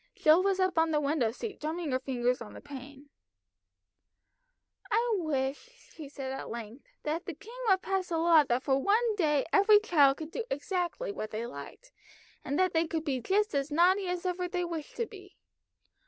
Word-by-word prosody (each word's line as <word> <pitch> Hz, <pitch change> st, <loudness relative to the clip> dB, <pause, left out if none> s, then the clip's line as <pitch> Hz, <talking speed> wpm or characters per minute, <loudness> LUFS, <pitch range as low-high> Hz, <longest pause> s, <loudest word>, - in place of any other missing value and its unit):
Jill 315 Hz, +3 st, +5 dB
was 385 Hz, 0 st, +1 dB
up 370 Hz, -3 st, +2 dB
on 325 Hz, 0 st, +3 dB
the 305 Hz, -1 st, +2 dB
window 285 Hz, -5 st, +1 dB
seat 395 Hz, -, -6 dB
drumming 315 Hz, 0 st, -3 dB
her 255 Hz, -, +1 dB
fingers 250 Hz, -2 st, -1 dB
on 220 Hz, -, -8 dB
the -, -, -9 dB
pane. 285 Hz, 0 st, -11 dB, 1.8 s
"I 465 Hz, +3 st, +2 dB
wish," 310 Hz, -, -4 dB
she 300 Hz, -4 st, -9 dB
said 270 Hz, -2 st, -6 dB
at 270 Hz, -, -6 dB
length, 235 Hz, -, -8 dB, 0.2 s
"that 320 Hz, +5 st, -3 dB
the 350 Hz, -, -4 dB
king 410 Hz, +8 st, -13 dB, 0.2 s
would 380 Hz, -1 st, +3 dB
pass 385 Hz, -1 st, -1 dB
a 335 Hz, -, 0 dB
law 325 Hz, -2 st, +6 dB
that 245 Hz, 0 st, 0 dB
for 270 Hz, -1 st, +2 dB
one 435 Hz, -, +2 dB
day 300 Hz, -7 st, +2 dB
every 415 Hz, +1 st, +7 dB
child 290 Hz, -10 st, +4 dB
could 315 Hz, 0 st, -7 dB
do 470 Hz, -, -3 dB
exactly 360 Hz, -, -2 dB
what 215 Hz, -, -5 dB
they 220 Hz, +2 st, -4 dB
liked, 235 Hz, -, -10 dB, 0.5 s
that 360 Hz, +7 st, +1 dB
they 325 Hz, 0 st, +2 dB
could 320 Hz, -1 st, -2 dB
be 270 Hz, -4 st, -1 dB
just 415 Hz, -, +1 dB
as 280 Hz, 0 st, 0 dB
naughty 365 Hz, +5 st, +3 dB
as 360 Hz, 0 st, -3 dB
ever 360 Hz, 0 st, -1 dB
they 355 Hz, 0 st, -2 dB
wished 330 Hz, -3 st, -6 dB
to 470 Hz, -, -1 dB
be. 385 Hz, -4 st, -14 dB
325 Hz, 190 wpm, -30 LUFS, 275-380 Hz, 1.8 s, every